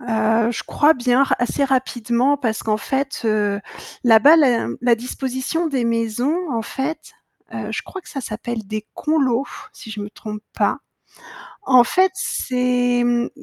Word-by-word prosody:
Heu, 225 -1 +1
je 235 - -4
crois 300 +2 +3
bien 250 0 +2
r - - +1
assez 245 +4 0
rapidement 255 0 +1
parce 225 -5 -2
qu'en 215 -1 0
fait, 270 +5 -3
heu, 210 -2 +1 0.4
là-bas, 240 +7 +7
la 260 -7 +3
la 240 0 +4
disposition 260 +7 -3
des 265 -4 -1
maisons 230 +5 0 0.2
en 230 -1 -1
fait, 270 +7 -5 0.4
heu, - - -5
je - - -3
crois 385 - -8
que - - -17
ça 275 - -5
s'appelle 225 -1 -5
des 215 +1 -5
conlots, 275 -4 +1 0.3
si 220 - -11
je 215 -1 -6
me 205 0 -6
trompe 210 0 -8
pas. - - +1 0.8
En 255 -10 +6
fait, 370 +8 +2
c'est 250 -6 0
mmh, 240 0 +1
245 Hz, 160 wpm, -20 LUFS, 225-270 Hz, 0.8 s, là-bas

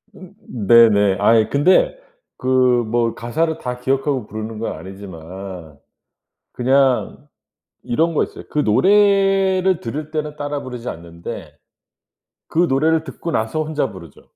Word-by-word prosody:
음 190 0 -13 0.3
네네. 105 -4 +5
아이 110 +1 +4
근데 185 - +3 0.4
그 130 - -3 0.4
뭐 115 +1 0
가사를 160 +7 -1
다 125 0 -5
기억하고 135 -2 -1
부르는 110 0 -6
건 115 - -3
아니지만 95 -3 -10 0.8
그냥 135 +2 +1 0.5
이런 165 +7 0
거 - - +2
있어요. - - -11
그 150 - -3
노래를 190 - +3
들을 150 +6 -5
때는 150 -1 -4
따라 145 -1 -4
부르지 125 -2 -7
않는데 85 0 -8 0.9
그 165 - 0
노래를 155 +4 +2
듣고 170 - -6
나서 110 +7 -1
혼자 150 -3 -2
부르죠. 85 -6 -13
130 Hz, 260 characters per minute, -19 LUFS, 110-155 Hz, 0.9 s, 네네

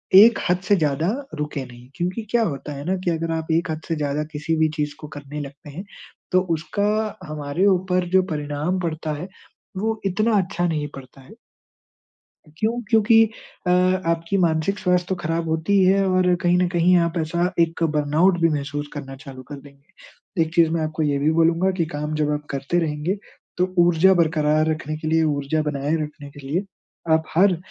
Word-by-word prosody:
एक 220 +5 +8
हद 180 - +3
से 205 - +5
ज़्यादा 155 -1 0 0.3
रुके 150 -2 -4
नहीं। 120 0 -14
क्योंकि 180 +5 -2
क्या 235 -1 +3
होता 145 -5 -4
है 140 0 -7
ना 190 +2 0
कि 175 - +2
अगर 165 0 -2
आप 160 0 -4
एक 165 +1 +1
हद 155 0 -4
से 165 - -1
ज़्यादा 150 0 -1
किसी 155 +2 -1
भी 155 0 +3
चीज़ 150 -1 -2
को 150 - -8
करने 145 +1 -7
लगते 140 +1 -10
हैं, 180 +7 -7 0.5
तो 185 - +4
उसका 185 +6 -2 0.4
हमारे 150 +4 -1
ऊपर 185 -1 +2
जो 190 -1 +5
परिणाम 150 +5 -2
पड़ता 160 -2 -3
है, 155 +5 -6 0.5
वो 220 +2 -1
इतना 215 +3 +2
अच्छा 180 -2 0
नहीं 150 -3 -1
पड़ता 135 0 -12
है। 185 +11 -15 1.2
क्यों? 230 +4 0
क्योंकि 225 0 +5 0.4
अ, 180 - +3
आपकी 180 -1 +1
मानसिक 170 +2 +1
स्वास्थ्य 180 -1 +1
तो 190 - 0
खराब 165 +1 -1
होती 160 +5 +1
ही 185 - +5
है 195 +1 +4
और 185 -1 +3
कहीं 175 0 +3
ना 180 - +2
कहीं 175 +1 +4
आप 170 - -5
ऐसा 170 +3 0
एक 165 0 +1
बर्नआउट 155 +5 +3
भी 165 - +4
महसूस 145 0 -3
करना 135 -2 -7
चालू 135 -2 -11
कर 145 - -6
देंगे। 140 +5 -9
एक 160 0 -7
चीज़ 165 -2 +5
मैं 165 -1 0
आपको 155 0 -2
ये 145 -2 +1
भी 150 +2 +2
बोलूँगा 165 +3 +3
कि 165 - +2
काम 150 +1 -3
जब 150 -1 0
आप 150 0 -3
करते 140 +5 -1
रहेंगे, 160 +4 -1 0.4
तो 185 +1 0
ऊर्जा 175 +2 +5
बरकरार 155 -3 +2
रखने 155 -1 -3
के 155 - -6
लिए, 160 0 +3
ऊर्जा 150 0 0
बनाए 150 +1 -1
रखने 150 -1 -9
के 140 -1 -11
लिए 175 +7 -1 0.5
आप 160 0 +3
हर 185 -1 +4
160 Hz, 195 wpm, -22 LUFS, 150-180 Hz, 1.2 s, एक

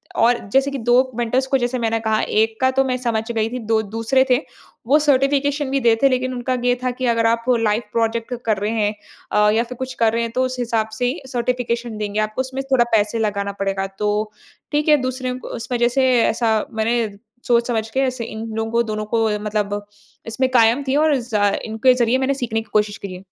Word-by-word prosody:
और 235 +1 +4 0.2
जैसे 275 +1 +3
कि 275 - -3
2 240 0 +2 0.2
मेंटर्स 240 +3 0
को 270 - +2
जैसे 245 +1 -1
मैंने 225 -1 0
कहा, 220 -1 0
1 220 +1 0
का 260 - +4
तो 270 +1 +2
मैं 255 -1 0
समझ 230 -3 -1
गई 225 -1 0
थी 250 +1 -4
2 220 0 +2
दूसरे 225 +5 +1
थे 250 - +5 0.5
वो 290 +3 +5
सर्टिफिकेशन 285 0 +1
भी 275 - +1
दे 240 -3 +3
रहे - - +2
थे। 275 - +7
लेकिन 255 0 0
उनका 250 +1 -2
ये 245 0 +3
था 255 - +1
कि 255 +1 -4
अगर 230 0 +1
आप 230 0 +1 0.2
लाइव 215 0 +1
प्रोजेक्ट 230 +1 -1
कर 215 -3 +1
रहे 205 +3 -2
हैं 210 -2 0 0.4
अ, 210 0 +4
या 225 +2 +2
फ़िर 250 +1 -9
कुछ 260 0 -5
कर 225 -1 +3
रहे 230 - 0
हैं। 230 - -3
तो 255 - +2
उस 255 0 -4
हिसाब 225 -2 -1
से 250 - 0
ही 255 +7 -2
सर्टिफिकेशन 235 -2 -2
देंगे 210 0 -2
आपको, 215 +3 -1
उसमें 265 +1 -4
थोड़ा 245 -2 +5
पैसे 210 +2 +1
लगाना 200 -2 -1
पड़ेगा। 195 0 -1
तो 210 +1 0 0.4
ठीक 295 +1 0
है, 300 - +7
दूसरे 255 0 -2
उस 245 -2 -6
वजह 240 -1 +2
से 260 -1 +4
ऐसा 225 -1 +1 0.2
मैंने 225 +1 0 0.4
सोच-समझ 235 -2 +1
के 265 - -2
ऐसे 255 -3 -1
इन 220 0 -6
लोगों 225 0 -2
को 235 0 +2
दोनों 215 -1 -4
को 225 -1 +3
मतलब 205 -1 -2 0.4
इसमें 255 +3 0
कायम 240 +2 +4
थी 265 - +1
और 305 0 +3
ज 230 -2 -6 0.3
इनके 225 +3 +3
ज़रिए 245 0 +2
मैंने 265 +1 +1
सीखने 230 -4 -2
की 220 - -16
कोशिश 210 0 +1
करी 195 -2 -7
है। 180 +1 -10
235 Hz, 225 wpm, -20 LUFS, 220-255 Hz, 0.5 s, थे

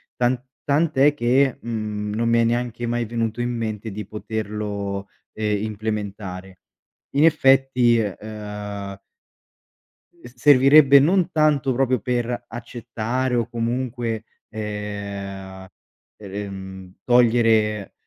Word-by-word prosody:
Tan 120 0 +1 0.2
tant' 150 +1 +1
è 145 +2 +6
che, 130 0 +2
mhmm, 105 -2 -4
non 115 +2 0
mi 115 0 +3
è 115 - +4
neanche 120 0 -1
mai 120 0 -1
venuto 115 0 -2
in 120 - -1
mente 110 -1 -4
di 105 0 -6
poterlo, 105 -2 -4 0.3
ehm, 105 -1 -1
implementare. 100 -3 -5 0.6
In 145 +3 +5
effetti, 135 -5 +4
ehm 105 -1 -5 1.3
s 120 - -12
servirebbe 140 +2 +7
non 180 +4 +2
tanto 150 -4 +2
proprio 130 -1 +1
per 120 +1 -2
accettare 120 +1 -3
o 120 -2 0
comunque, 120 -1 -3 0.2
ehm, 100 -3 -6 0.5
e, 100 0 -6
mhmm, 95 -1 -9
togliere, 115 -4 +3
115 Hz, 110 wpm, -22 LUFS, 105-125 Hz, 1.3 s, servirebbe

